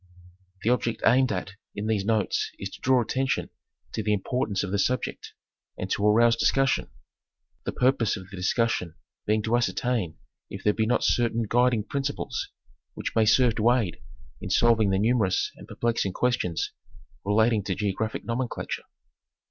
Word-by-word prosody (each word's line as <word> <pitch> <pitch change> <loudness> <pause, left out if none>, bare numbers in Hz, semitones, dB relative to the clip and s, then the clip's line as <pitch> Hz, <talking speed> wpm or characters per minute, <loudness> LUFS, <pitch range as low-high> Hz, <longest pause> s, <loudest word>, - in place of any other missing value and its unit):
The 115 - +3
object 120 -2 -1
aimed 130 0 +4
at 95 -1 -3 0.2
in 105 +1 -4
these 110 -3 0
notes 105 -2 0
is 95 0 -6
to - - -12
draw 130 -2 +3
attention 135 +3 -1 0.4
to - - -1
the 105 0 +1
importance 105 -1 -1
of 100 - -4
the 100 - 0
subject 125 +5 -2 0.4
and - - -5
to 100 - 0
arouse 115 +2 +5
discussion; 135 +3 +2 0.8
the - - -1
purpose 125 -4 +2
of 95 -2 -10
the 95 - -10
discussion 90 -2 0 0.3
being 105 0 +2
to 110 +2 +1
ascertain 120 -7 -1 0.3
if 95 - -8
there 105 - +3
be 110 0 0
not 125 - +1
certain 115 -1 +2
guid 120 +3 +3
ing 105 - -2
principles 140 +5 -3 0.5
which - - -5
may 110 - +4
serve 120 +1 +4
to 115 +2 +4
aid 110 -9 -1 0.4
in - - -5
solving 115 -3 +4
the 95 - +2
numerous 105 -3 +1
and - - -13
perplexing 115 -5 -1
questions 120 -9 0 0.5
relating 110 +1 +2
to 95 - -1
geographic 105 +2 -2
nomenclature. 120 +2 -3
110 Hz, 165 wpm, -26 LUFS, 100-120 Hz, 0.8 s, arouse